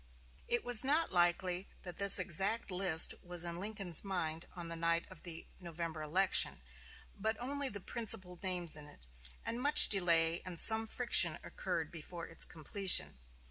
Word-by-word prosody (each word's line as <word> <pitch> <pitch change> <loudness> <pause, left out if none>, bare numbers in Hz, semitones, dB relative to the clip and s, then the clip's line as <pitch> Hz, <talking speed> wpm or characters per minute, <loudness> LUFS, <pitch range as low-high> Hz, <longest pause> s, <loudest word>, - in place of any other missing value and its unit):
It 240 - -3
is 245 -1 +3
not 300 +5 -1
likely 175 +1 -2 0.2
that 180 -2 -11
this 200 -1 +10
exact 195 +6 -2
list 180 -3 +4
was 175 -1 -4
in 170 -1 -6
Lincoln's 195 -4 -2
mind 170 -4 -5
on 175 -2 -7
the 165 - -4
night 165 0 -3
of 185 - -16
the 170 -2 -5
November 170 -2 -8
election, 165 - -1 0.6
but 220 +2 -4
only 280 +2 -3
the 205 - -10
principal 195 -6 -2
names 180 -4 -4
in 150 -1 -9
it; 145 - -11 0.4
and 235 +2 -6
much 290 +3 +6
delay 170 -4 +3
and 180 -3 -7
some 220 0 +6
friction 245 +2 +3
occurred - - -7
before 170 +1 -9
its 165 - -2
completion. 180 - 0
180 Hz, 160 wpm, -31 LUFS, 170-210 Hz, 0.6 s, this